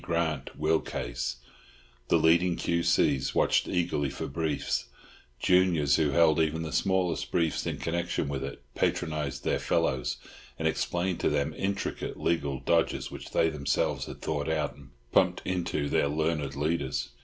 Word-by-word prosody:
Grant 80 -5 -2
will 80 +1 +2
case? - - -4 0.7
The - - +4
leading 85 +2 +4
Q.C.'s. 85 -5 +1
watched - - +3
eagerly 85 -6 0
for 70 - -5
briefs; 75 0 -1 0.5
juniors 90 -7 +4
who 75 -2 +2
held 80 +2 +4
even 80 +1 +1
the 80 - -5
smallest 95 -3 +1
briefs 80 -3 0
in - - -2
connection 85 -2 -1
with 70 -1 -3
it 70 +1 -7
patronised 75 -4 -1
their - - +1
fellows, 65 -1 0 0.4
and 80 - 0
explained 85 +3 -1
to - - +2
them 70 +2 0
intricate 100 +1 -3
legal 70 -5 0
dodges 85 -1 +1
which - - -8
they 80 - +2
themselves 70 -2 0
had - - -9
thought 75 0 -1
out 75 -2 -1
and 70 -1 -15 0.2
"pumped - - +3
into" 85 -5 -1
their 70 - +2
learned 75 -2 -1
leaders. 75 -3 -1
80 Hz, 150 wpm, -29 LUFS, 70-85 Hz, 0.7 s, The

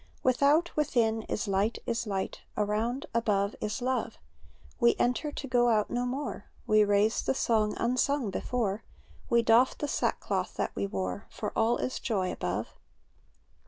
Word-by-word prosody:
Without, 285 +7 +3
within, 230 -7 +1
is 210 - -2
light, 200 +3 +1
is 235 0 -2
light; 195 -2 -3 0.2
Around, 220 +5 0
above, 205 -3 +1
is 215 +3 -3
love; 255 0 -1 0.6
We 235 -2 +5
enter, 250 +5 0
to 285 - -6
go 240 -1 +3
out 215 -2 +2
no 245 +1 0
more. 265 -4 -4 0.2
We 215 0 +5
raise 205 +2 +2
the - - 0
song 215 -4 +1
unsung 250 -1 +1
before. 220 0 -2 0.5
We 235 0 +4
doff 230 +3 +4
the 295 - -2
sackcloth - - -1
that - - -2
we 200 - -1
wore; 195 0 -4
For 210 - -5
all 225 +2 +2
is 255 - -3
joy 190 -6 -1
above. 95 +5 -3
230 Hz, 155 wpm, -29 LUFS, 210-250 Hz, 0.6 s, We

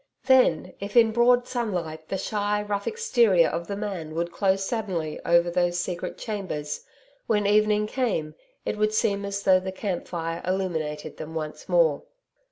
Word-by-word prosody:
Then, 255 -12 +4
if 200 +4 -3
in 225 -2 +6
broad 245 +2 +4
sunlight 175 -10 -3
the 195 - -2
shy, 205 +1 -1
rough 205 -1 -3
exterior 235 - +3
of 170 +2 -3
the 200 - -3
man 190 -7 -5
would 170 +1 -1
close 195 -1 +1
suddenly 185 -9 -3
over 170 0 +4
those 175 0 +1
secret 175 -1 -4
chambers, 185 -9 -4 0.4
when 210 -2 +2
evening 210 +1 +3
came, 210 -10 -1 0.3
it - - -2
would 215 0 +2
seem 200 -2 +1
as 200 0 -3
though 185 -1 +5
the 190 0 -5
camp 190 -1 -4
fire 165 -1 -4
illuminated 160 -5 -2
them 160 +1 -7
once 155 +2 -5
more. 165 -5 +3
190 Hz, 165 wpm, -26 LUFS, 170-210 Hz, 0.4 s, in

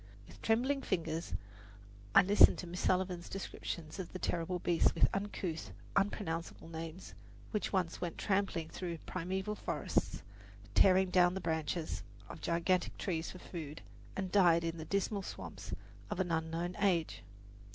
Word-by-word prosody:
With - - -14
trembling 255 +5 +2
fingers 165 -6 -2 0.8
I - - +10
listened 200 +3 +7
to - - -5
Miss 175 +1 -5
Sullivan's 180 -2 +1
descriptions 170 -3 -5
of 180 - -5
the - - -3
terrible 180 0 -1
beasts, 170 -1 +3
with - - +5
uncouth, 195 -4 -3 0.3
unpronounceable 170 -5 -1
names, 165 +2 -7 0.4
which 210 - -1
once 185 -4 0
went 175 -2 -3
tramping 190 -5 0
through 170 -1 -4
the - - -19
primeval 190 +3 -2
forests, 210 - -1 0.5
tearing 185 - +5
down 180 0 +5
the - - -1
branches 160 - -1 0.3
of - - -8
gigantic 170 +2 +1
trees 165 -4 -2
for - - -8
food, 155 -4 -7 0.3
and 190 -1 -2
died 175 -4 +5
in 165 0 -2
the 155 - -5
dismal 200 +3 0
swamps - - -7 0.4
of - - -3
an 180 -2 0
unknown 165 +2 -1
age. 180 - +2
180 Hz, 150 wpm, -34 LUFS, 165-190 Hz, 0.8 s, I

